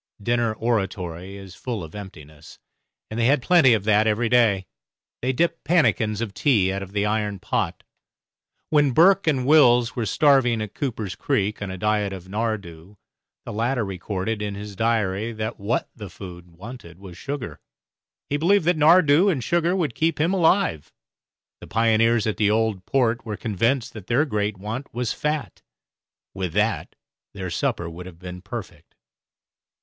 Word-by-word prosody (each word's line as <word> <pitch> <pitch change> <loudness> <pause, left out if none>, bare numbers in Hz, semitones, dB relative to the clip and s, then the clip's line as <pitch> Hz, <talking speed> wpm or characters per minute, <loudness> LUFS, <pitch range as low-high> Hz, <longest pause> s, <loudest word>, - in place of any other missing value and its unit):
Dinner 120 +1 0
oratory 95 -5 -3
is 95 -2 -11
full 115 -2 -5
of 80 - -10
emptiness 75 -7 -11 0.5
and 110 - -4
they 115 - +3
had 140 +2 +4
plenty 140 -3 +5
of 105 -3 0
that 105 +1 +3
every 110 +2 +1
day. 110 -6 +3 0.6
They 130 - +1
dipped 165 +5 0
pannikins 115 - +2
of 110 -4 -4
tea 100 -10 +2
out 95 - -3
of 95 -1 -8
the 105 0 0
iron 105 -1 -1
pot. - - -2 0.9
When 145 -3 +3
Burke 190 +5 +5
and 135 -5 +1
Wills 125 -5 +5
were 115 -3 -2
starving 135 -5 +3
at 105 -1 -5
Cooper's 110 -8 -3
Creek 105 -8 -1
on 100 - -4
a 95 - -6
diet 105 0 0
of 95 -1 -9
nardoo, 100 -4 -4 0.5
the - - -6
latter 115 +2 0
recorded 95 +3 -4
in 105 -1 -3
his 100 0 -8
diary 110 -1 0
that 110 +1 -5
what 105 +5 -1
the 105 -4 -8
food 90 -2 -11
wanted 90 -1 -11
was 95 -2 -11
sugar; 125 - -6 0.7
he 145 - -1
believed 175 +3 +3
that 175 -1 +2
nardoo 160 +3 +5
and 140 -10 -1
sugar 170 +4 +1
would 165 -9 -1
keep 160 +3 0
him 165 +5 +2
alive. 170 - +2 0.7
The - - -11
pioneers 115 0 +2
at 110 - -1
the 105 -1 +2
Old 110 -3 0
Port 120 -4 +1
were 105 -2 -5
convinced 115 +4 -1
that 105 -5 -10
their 130 +6 +2
great 105 -6 -2
want 110 +8 -6
was 120 -2 -1
fat; 150 0 -3 0.7
with 95 -4 -4
that 105 +3 0 0.4
their 95 -2 -5
supper 85 +1 -1
would 85 +2 -8
have 90 -3 -12
been 90 0 -9
perfect. - - -9
110 Hz, 165 wpm, -23 LUFS, 95-130 Hz, 0.9 s, plenty